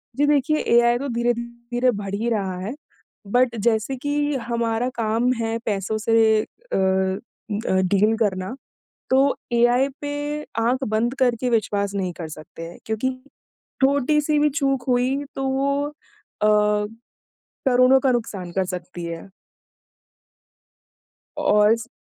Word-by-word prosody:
जी, 290 - +2
देखिए 295 +1 +2 0.2
एआई 240 0 +4
तो 280 +3 -4
धीरे-धीरे 235 +1 -1
बढ़ 200 -3 -5
ही 225 +3 -1
रहा 195 -5 -1
है। 200 +6 -4 0.6
बट 245 -1 +3
जैसे 225 +3 +1
कि 290 +2 -1
हमारा 235 +1 0
काम 230 +2 +1
है 225 0 -1
पैसों 205 -1 -1
से 220 0 +3
अ - - -8 0.8
अ, 190 -3 +1
डील 200 +4 +3
करना, 195 -1 -1 0.6
तो 270 +2 +4 0.2
एआई 240 +3 +4
पे 290 +1 -3 0.2
आँख 250 +4 +1
बंद 220 +4 0
करके 250 -1 +2
विश्वास 205 -3 0
नहीं 185 -2 -1
कर 165 - -5
सकते 155 +2 -10
हैं 170 - -11
क्योंकि 220 +4 -1 0.7
छोटी-सी 290 +2 +3
भी 300 0 +3
चूक 275 -3 0
हुई, 255 +3 +1
तो 270 - -2
वो 280 +1 +1
अ, - - -11 1.8
करोड़ों 255 +1 +5
का 265 0 +2
नुकसान 200 -7 -3
कर 190 +1 0
सकती 180 -1 -6
है। 170 +3 -7 2.1
औ 210 0 +4
इस 230 0 0
235 Hz, 130 wpm, -23 LUFS, 210-265 Hz, 2.1 s, करोड़ों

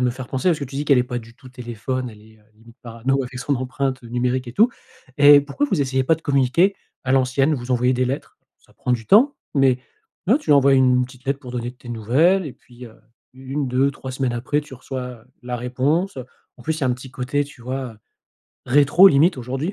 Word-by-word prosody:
me 125 - +2
faire 130 +1 -7
penser 130 +7 -1
parce 165 - +2
que 145 - -4
tu 135 +1 -9
dis 145 - -2
qu'elle 140 -4 +4
est - - +3
pas 125 0 -4
du 115 0 -14
tout 130 +1 -15
téléphone, 125 +1 -5
elle 105 - -15
est, 110 0 -20
heu, 105 - -27
limite 115 +2 -19
parano 125 +3 -1
avec 125 0 -8
son 140 +3 -1
empreinte, 130 +1 -3
heu, 120 - -11
numérique 125 +1 -1
et - - -8
tout 225 - +4 0.5
et 145 0 +8
pourquoi 145 - -2
vous 165 - +1
essayez 130 -1 0
pas 160 - +3
de 160 - -14
communiquer 145 +8 +2 0.3
à 130 - -2
l'ancienne? 135 +3 +2
Vous 120 -1 -6
envoyez 125 +1 +2
des 125 +1 +1
lettres, 135 +3 -5 0.2
ça - - -27
prend 125 - -2
du 115 -3 -2
temps 255 +8 +5 0.2
mais 135 -2 +3 0.5
ouais, 235 +9 +4
tu 300 - -18
lui - - +8
envoies 140 0 +5
une 125 -1 +4
petite 130 +1 -15
lettre 140 0 -1
pour 125 - -10
donner 120 -1 -3
tes 125 -1 -15
nouvelles 140 - +2
et 140 - -7
puis, 125 0 -15
heu, 110 - -15 0.4
1-2-3 135 0 -2
semaines 130 -2 -1
après 130 +5 -1
tu 145 -3 -12
reçois, 130 +1 -6 0.2
heu, - - -24 0.2
la 125 0 -4
réponse, 135 +9 -1
heu. 125 - -7 0.3
En 120 - -13
plus 160 +4 -2
il - - -8
y - - +3
a - - +2
un 125 - +2
petit 130 +1 -11
côté 135 +3 -2
tu 140 -4 -15
vois, 130 -1 -4
heu, 105 - -23 0.7
rétro 145 +8 +6
limite 160 +2 +3
aujourd'hui. 135 - -3
130 Hz, 245 wpm, -21 LUFS, 125-145 Hz, 0.7 s, et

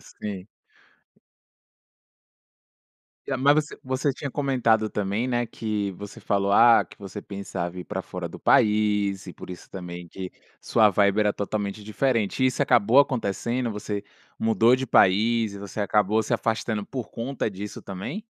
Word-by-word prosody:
Sim. 100 -3 -7 2.8
Eh, - - -1
mas 140 +2 +5
você 150 0 -1
você 130 +2 -1
tinha 140 +1 -6
comentado 120 -6 +1
também, 105 +3 -1
né, 120 -1 0
que 105 -3 -3
você 100 +2 -10
falou, 100 -1 0
ah, 115 +2 +7
que - - -18
você 100 +1 -8
pensava 95 -3 -5
em - - -5
ir - - -8
para - - -4
fora - - -6
do - - -10
país 105 -2 +2
e 90 - -7
por - - -11
isso 90 -1 -10
também 90 -2 -7
que 95 +2 -7 0.3
sua 110 -2 +4
vibe 100 +1 +3
era 105 -1 +2
totalmente 100 0 -3
diferente. 115 +2 0
Isso 130 -1 +2
acabou 120 +1 +4
acontecendo? 120 -1 +1
Você 105 -1 -4 0.3
mudou 115 +2 +4
de 130 +1 -3
país 110 +1 +3
e - - -7
você 100 +1 -6
acabou 105 +1 +2
se - - 0
afastando 110 -2 -1
por 125 -1 -6
conta 120 -1 -3
disso 100 +1 -7
também? 100 - -6
105 Hz, 155 wpm, -25 LUFS, 100-120 Hz, 2.8 s, ah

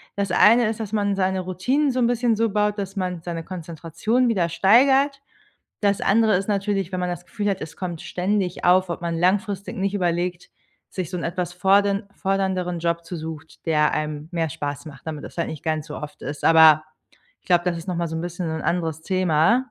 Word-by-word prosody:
Das 200 -2 -1
eine 230 +5 +6
ist, 220 +1 -3
dass 215 -3 -5
man 205 -2 +1
seine 190 0 0
Routinen 250 - 0
so 255 - -2
'n 240 - +3
bisschen 240 -1 +1
so 225 +1 +1
baut, 210 0 0
dass 195 0 -5
man 180 -3 -3
seine 165 -1 -5
Konzentration 170 +7 -2
wieder 180 -7 +1
steigert. 270 - +4 0.6
Das 200 -1 +1
andere 220 0 +3
ist 195 +3 -3
natürlich, 195 -2 -1
wenn 185 - -3
man 180 0 -1
das 175 0 -6
Gefühl 205 +1 -2
hat, 190 - -2
es 155 +1 -8
kommt 175 -3 -5
ständig 185 0 -2
auf, 185 +1 +4
ob 170 0 -5
man 170 -1 -2
langfristig 195 +2 0
nicht 195 +1 -1
überlegt, 175 -1 -1 0.4
sich 185 -4 -5
so 180 - -3
'n - - -5
etwas 175 0 -3
fordern 200 +3 +2
fordernderen 190 -2 -1
Job 170 0 -1
zu 175 +2 -6
sucht, 160 -1 -9
der 150 -2 +3
einem 150 0 -3
mehr 165 -2 0
Spaß 145 +1 -5
macht, 145 0 -12
damit 155 -2 -5
das - - -10
halt 170 - -1
nicht 155 - -7
gar 160 -1 0
nicht 155 - -6
so 150 - -7
oft 150 -1 -9
ist. 145 -1 -6
Aber, 160 -1 +7 0.6
ich - - -36
glaube, 175 -1 +3
das 180 -2 0
ist 165 - -8
noch 180 - -1
mal 170 -1 -1
so 160 - -4
'n 160 - -3
bisschen 175 0 -4
so 160 - -2
'n 160 - -4
anderes 160 -3 -1
Thema. 185 +8 +2
180 Hz, 220 wpm, -23 LUFS, 165-200 Hz, 0.6 s, Aber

